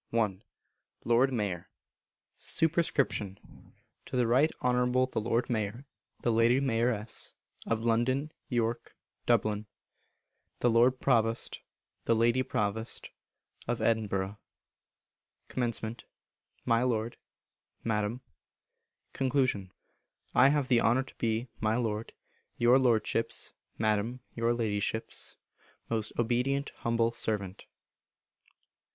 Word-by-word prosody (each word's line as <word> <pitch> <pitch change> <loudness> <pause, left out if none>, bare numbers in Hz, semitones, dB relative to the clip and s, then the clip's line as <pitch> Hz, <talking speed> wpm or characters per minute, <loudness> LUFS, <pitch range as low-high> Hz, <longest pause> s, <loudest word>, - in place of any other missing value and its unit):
i. 110 -5 +1 0.7
Lord 120 +3 +4
Mayor. 100 -8 -2 0.7
Sup. 160 -1 +1
To 170 +1 +2 1.3
the 125 -1 +1
Right 130 +7 +4
Honourable 125 0 +2
the 130 -4 -3
Lord 115 +2 0
Mayor 115 +2 -2 0.4
(The 120 - +2
Lady 115 +3 +4
Mayoress) 115 -4 +1 0.3
of 115 0 0
London, 130 +6 +1 0.2
York, 115 -1 -1 0.3
Dublin; 105 0 +2 0.9
The 120 - +4
Lord 125 +3 +4
Provost 115 0 +1 0.4
(The 115 - +3
Lady 120 +3 +3
Provost) 110 -3 -3 0.6
of - - -1
Edinburgh. 100 -3 0 1.1
Comm. 115 -2 -2 0.7
My 115 0 +3
Lord 115 -2 0 0.7
(Madam). 110 +2 -1 0.9
Con. 130 -8 +1 0.6
I 125 - +7
have 145 -2 +1
the 120 -3 +4
honour 120 +4 +3
to - - -16
be, 115 +2 0
my 110 0 +2
Lord, 110 -2 -2 0.5
Your 120 +3 +5
Lordship's 115 -2 +1 0.2
(Madam, 110 +3 0
Your 115 0 +1
Ladyship's) 110 -1 -2 0.5
most 110 -2 0
obedient 125 +4 +1
humble 115 0 +1
servant. 100 -5 -3
115 Hz, 100 wpm, -30 LUFS, 110-125 Hz, 1.3 s, I